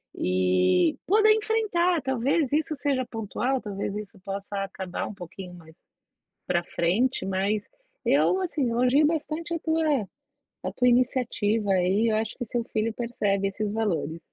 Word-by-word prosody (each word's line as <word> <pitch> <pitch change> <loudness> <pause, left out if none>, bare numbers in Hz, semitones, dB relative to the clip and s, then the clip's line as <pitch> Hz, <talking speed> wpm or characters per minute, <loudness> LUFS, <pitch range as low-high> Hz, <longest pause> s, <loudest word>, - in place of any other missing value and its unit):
e 90 0 +2
poder 430 +3 +5
enfrentar, 420 -6 +1
talvez 265 +3 +1
isso 310 +1 +1
seja 275 -2 0
pontual, 240 +4 -2
talvez 200 -1 -4
isso 210 0 -7
possa 200 0 -4
acabar 190 -2 -5
um - - -7
pouquinho 180 -1 -9
mais 160 -2 -15 0.7
pra 175 -1 +1
frente 195 +11 0
mas 195 +2 0 0.4
eu, 375 - +3
assim, 320 -7 -1
elogio 250 +5 +3
bastante 320 +2 -2
a 335 - -1
tua 320 0 0 0.8
a - - -2
tua 250 - +2
iniciativa 235 -4 +1
aí, 190 +4 +2
eu 215 - +1
acho 220 0 -2
que 250 - -3
seu 235 +1 -2
filho 220 0 -1
percebe 205 -5 -1
esses 205 +1 -3
valores. 170 -8 -1
225 Hz, 145 wpm, -26 LUFS, 195-280 Hz, 0.8 s, poder